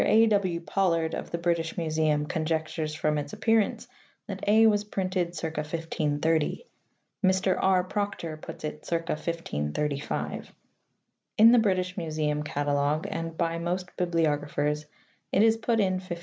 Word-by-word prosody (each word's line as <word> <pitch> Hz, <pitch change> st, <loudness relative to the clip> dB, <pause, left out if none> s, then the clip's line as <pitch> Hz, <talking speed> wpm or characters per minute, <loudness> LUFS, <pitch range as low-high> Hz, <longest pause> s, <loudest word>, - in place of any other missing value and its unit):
A. 225 Hz, +1 st, +5 dB
W. 200 Hz, -6 st, +1 dB
Pollard 165 Hz, -3 st, +1 dB
of -, -, -4 dB
the 170 Hz, -, -2 dB
British 170 Hz, -1 st, -1 dB
Museum 155 Hz, -2 st, +1 dB
conjectures 155 Hz, -1 st, -2 dB
from 150 Hz, -1 st, 0 dB
its 145 Hz, 0 st, -6 dB
appearance 225 Hz, -3 st, +1 dB, 0.4 s
that -, -, -6 dB
(a) 220 Hz, +2 st, +6 dB
was 210 Hz, -2 st, +4 dB
printed 185 Hz, -4 st, -2 dB
circa 160 Hz, -1 st, -3 dB
1530; 155 Hz, -, -1 dB, 0.6 s
Mr. 190 Hz, 0 st, +3 dB
R. 190 Hz, -1 st, +4 dB
Proctor 190 Hz, -4 st, -3 dB
puts 155 Hz, -, -10 dB
it 150 Hz, 0 st, -5 dB
circa 165 Hz, -1 st, -2 dB
1535. 150 Hz, -, -3 dB, 0.8 s
In 225 Hz, +1 st, +8 dB
the 245 Hz, -, +6 dB
British 185 Hz, -3 st, 0 dB
Museum 155 Hz, -3 st, -1 dB
catalogue 145 Hz, +2 st, 0 dB
and 165 Hz, -4 st, -4 dB
by 165 Hz, -1 st, 0 dB
most 180 Hz, +2 st, -3 dB
bibliographers 150 Hz, -3 st, 0 dB, 0.4 s
it 200 Hz, -, +4 dB
is 225 Hz, 0 st, +5 dB
put 225 Hz, 0 st, 0 dB
in 190 Hz, -3 st, +2 dB
1524. 175 Hz, -2 st, -6 dB
165 Hz, 140 wpm, -27 LUFS, 155-190 Hz, 0.8 s, In